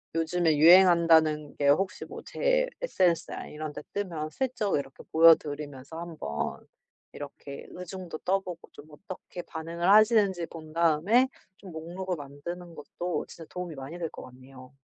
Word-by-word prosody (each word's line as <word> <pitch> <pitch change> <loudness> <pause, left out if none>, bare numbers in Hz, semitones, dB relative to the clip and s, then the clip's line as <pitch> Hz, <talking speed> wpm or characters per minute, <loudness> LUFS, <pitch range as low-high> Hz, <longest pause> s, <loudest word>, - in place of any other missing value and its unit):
요즘에 165 -1 +1
유행한다는 165 -3 +6
게 145 - +1
혹시 185 +6 +1
뭐 - - -9
제 - - +1
SNS나 185 - 0
이런 155 0 -6
데 - - -7
뜨면 170 -7 -3
슬쩍 250 - -1
이렇게 135 -1 -7
보여 165 0 +8
드리면서 145 0 -8
한번 160 - -5 0.5
이렇게 140 0 -9
의중도 180 -2 -7
떠 195 +2 +1
보고 180 -3 -9
좀 145 - -13
어떻게 180 +2 -9
반응을 170 +2 -3
하시는지 205 -4 +5
본 155 -2 -11
다음에 170 +10 +3 0.3
좀 190 - -12
목록을 175 +3 -5
만드는 165 +5 -8
것도 170 +2 -4
진짜 165 - -11
도움이 180 -3 -6
많이 135 +5 -8
될 165 -2 -3
것 - - -10
같네요. 130 +1 -14
165 Hz, 320 characters per minute, -28 LUFS, 150-185 Hz, 0.5 s, 보여